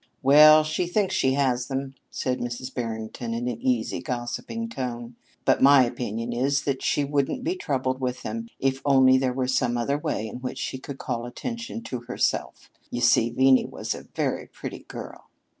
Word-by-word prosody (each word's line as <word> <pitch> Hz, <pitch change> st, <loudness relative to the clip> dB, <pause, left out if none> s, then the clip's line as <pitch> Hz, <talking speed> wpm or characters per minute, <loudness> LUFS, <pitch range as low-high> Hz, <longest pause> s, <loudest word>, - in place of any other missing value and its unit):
"Well, 155 Hz, +3 st, +8 dB
she 155 Hz, +3 st, -1 dB
thinks 195 Hz, +2 st, 0 dB
she 130 Hz, 0 st, +2 dB
has 130 Hz, -3 st, +1 dB
them," 135 Hz, 0 st, -3 dB, 0.2 s
said 130 Hz, -1 st, -2 dB
Mrs. 120 Hz, +2 st, -5 dB
Barrington 115 Hz, 0 st, -4 dB
in 120 Hz, +1 st, -2 dB
an 115 Hz, -2 st, -4 dB
easy, 125 Hz, -4 st, 0 dB
gossiping 125 Hz, -, -4 dB
tone; 120 Hz, -, -5 dB, 0.3 s
"but -, -, +3 dB
my 140 Hz, -1 st, +8 dB
opinion 120 Hz, -1 st, -4 dB
is 135 Hz, +3 st, +1 dB
that 135 Hz, -2 st, -1 dB
she 145 Hz, -, +1 dB
wouldn't 145 Hz, -, -1 dB
be 345 Hz, +4 st, 0 dB
troubled 130 Hz, -, -2 dB
with 125 Hz, -1 st, -2 dB
them 230 Hz, 0 st, -4 dB
if 135 Hz, 0 st, 0 dB
only 130 Hz, -2 st, +5 dB
there 130 Hz, -1 st, +1 dB
were 130 Hz, 0 st, -1 dB
some 120 Hz, -2 st, +1 dB
other 140 Hz, +5 st, 0 dB
way 110 Hz, -6 st, -2 dB
in 110 Hz, -, -7 dB
which 125 Hz, +1 st, -5 dB
she 130 Hz, -, -4 dB
could 135 Hz, 0 st, -8 dB
call 120 Hz, -2 st, -3 dB
attention 230 Hz, -, -6 dB
to 125 Hz, -, -4 dB
herself. 120 Hz, +1 st, -2 dB, 0.2 s
You 120 Hz, -, -3 dB
see, 120 Hz, -1 st, +4 dB
Venie 130 Hz, +2 st, +4 dB
was -, -, -4 dB
a -, -, -10 dB
very -, -, -1 dB
pretty -, -, -8 dB
girl." -, -, -9 dB
130 Hz, 185 wpm, -25 LUFS, 120-140 Hz, 0.3 s, Well